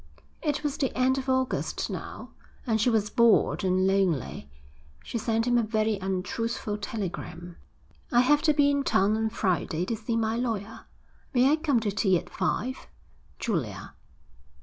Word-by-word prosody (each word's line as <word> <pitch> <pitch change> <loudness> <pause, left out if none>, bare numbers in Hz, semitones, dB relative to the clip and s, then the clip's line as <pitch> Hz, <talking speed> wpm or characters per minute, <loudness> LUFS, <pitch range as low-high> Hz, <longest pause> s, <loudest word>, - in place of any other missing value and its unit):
It 300 -1 -1
was 290 -2 -2
the 270 -4 0
end 260 +1 +3
of 265 0 -5
August 260 0 0
now, - - -7 0.3
and 220 -4 +1
she 245 - +3
was 210 -3 +1
bored 235 -5 +4
and 185 0 +2
lonely. 185 - 0 0.5
She 235 - -4
sent 225 +1 0
him 245 -1 +3
a - - +3
very 215 -1 0
untruthful 205 +3 -3
telegram. 175 -4 -6 0.5
I 240 - +5
have 295 +4 +4
to - - +5
be 285 -1 +4
in 280 0 +1
town 205 -5 +2
on 220 0 0
Friday 180 -5 -1
to 230 - -2
see 225 +1 -2
my 225 0 0
lawyer. 225 -3 -3 0.5
May 255 +3 +5
I - - +5
come 305 -6 +1
to 210 -2 -1
tea 195 -2 +2
at - - -8
five? 240 +7 -2 0.5
_Julia. 120 - -3
220 Hz, 165 wpm, -27 LUFS, 195-250 Hz, 0.5 s, I